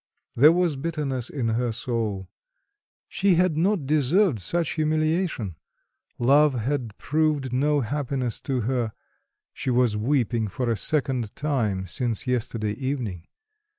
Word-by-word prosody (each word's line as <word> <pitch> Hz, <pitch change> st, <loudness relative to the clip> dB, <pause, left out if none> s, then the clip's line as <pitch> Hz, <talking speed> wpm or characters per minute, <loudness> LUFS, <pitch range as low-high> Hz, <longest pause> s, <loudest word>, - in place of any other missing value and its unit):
There 145 Hz, +6 st, +7 dB
was 170 Hz, -4 st, +1 dB
bitterness 135 Hz, -5 st, -2 dB
in 125 Hz, -5 st, -2 dB
her 120 Hz, +1 st, 0 dB
soul. 110 Hz, -5 st, -3 dB, 0.8 s
She 195 Hz, -2 st, +2 dB
had 180 Hz, -2 st, +2 dB
not 175 Hz, -1 st, +1 dB
deserved 150 Hz, -, +2 dB
such 165 Hz, -, 0 dB
humiliation. 155 Hz, -, 0 dB, 0.6 s
Love 140 Hz, +3 st, +4 dB
had 120 Hz, -2 st, -2 dB
proved 150 Hz, -4 st, 0 dB
no 145 Hz, +3 st, +2 dB
happiness 130 Hz, -1 st, -2 dB
to 130 Hz, -3 st, -1 dB
her: 120 Hz, -1 st, -1 dB, 0.6 s
she -, -, -4 dB
was 125 Hz, -3 st, +2 dB
weeping 115 Hz, -1 st, 0 dB
for 120 Hz, +4 st, -2 dB
a -, -, +1 dB
second 130 Hz, -2 st, -1 dB
time 115 Hz, -11 st, -1 dB
since 115 Hz, -, -2 dB
yesterday 115 Hz, -4 st, -1 dB
evening. 120 Hz, -, -4 dB
130 Hz, 125 wpm, -25 LUFS, 115-150 Hz, 0.8 s, There